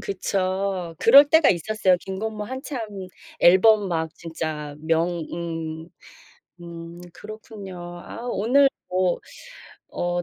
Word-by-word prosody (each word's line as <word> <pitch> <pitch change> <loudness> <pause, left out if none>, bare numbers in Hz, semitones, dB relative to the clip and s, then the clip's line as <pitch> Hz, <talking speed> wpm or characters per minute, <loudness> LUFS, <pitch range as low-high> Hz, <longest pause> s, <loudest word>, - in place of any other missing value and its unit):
그쵸. 190 -2 -2
그럴 280 +5 +8
때가 320 0 +5
있었어요. 185 +1 +1
김건모 210 +3 -5
한참 260 +2 -6 0.6
앨범 200 +3 +6
막 160 -2 -2
진짜 155 -3 -5
명 165 +1 0
음. 165 -1 -5 0.7
음. 170 0 -9
그렇군요. 210 -1 -10 0.3
아. 235 - -8
오늘 260 +8 +4 0.2
뭐 185 -1 +1 0.8
어 175 0 -1
185 Hz, 190 characters per minute, -23 LUFS, 165-215 Hz, 0.8 s, 그럴